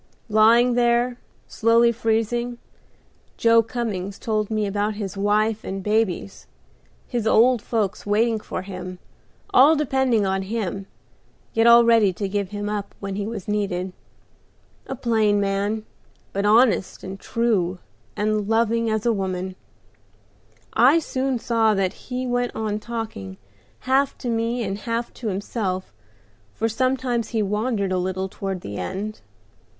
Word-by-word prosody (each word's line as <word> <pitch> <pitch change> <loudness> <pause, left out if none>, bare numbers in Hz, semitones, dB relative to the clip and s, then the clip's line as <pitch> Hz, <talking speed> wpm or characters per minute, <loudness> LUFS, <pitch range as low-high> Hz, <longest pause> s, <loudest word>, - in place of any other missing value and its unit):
Lying 230 +3 +5
there, 240 0 +2 0.3
slowly 230 +1 +3
freezing, 235 +1 -1 0.8
Joe 230 0 +5
Cummings 210 -5 -4
told 215 -2 -1
me 215 -1 0
about 205 +1 -1
his 205 -2 -5
wife 210 +2 +1
and 195 0 -5
babies, 210 -2 -1 0.6
his 235 -3 -2
old 235 +1 +4
folks 215 -3 -2
waiting 220 +2 +1
for 185 - -5
him, 185 -1 -7 0.6
all 285 +5 +7
depending 265 -7 +1
on 190 0 0
him, 195 -1 -3 0.7
yet 225 +1 +3
all 235 0 +8
ready 225 -4 +5
to 200 +2 -3
give 200 -1 -2
him 205 0 -4
up 205 -1 -4
when 200 -1 -4
he 200 +1 -3
was 220 -5 -6
needed. 190 -3 -2 0.9
A 265 - -4
plain 220 -5 +2
man, 200 +2 -1 0.5
but 200 +1 0
honest 220 -3 +3
and 190 +1 -7
true, 200 -7 0 0.4
and 210 -1 0
loving 230 0 +2
as 220 0 -1
a 235 - +3
woman; 185 -2 -3 1.2
I 255 +8 +6
soon 265 -4 -1
saw 225 -2 +2
that 190 -1 0
as - - -19
he 255 0 -3
went 245 0 -1
on 215 -1 -2
talking, 215 - -6 0.4
half 270 +2 +1
to 245 - -4
me 230 +1 0
and 195 -1 -3
half 230 +2 -3
to 235 - -6
himself, 195 -1 -3 0.6
for 225 - 0
sometimes 250 0 0
he 225 -3 0
wandered 210 -1 -1
a 185 - +1
little 190 +1 -2
toward 190 -1 -5
the 100 - -6
end. 200 - -4
215 Hz, 145 wpm, -23 LUFS, 195-235 Hz, 1.2 s, all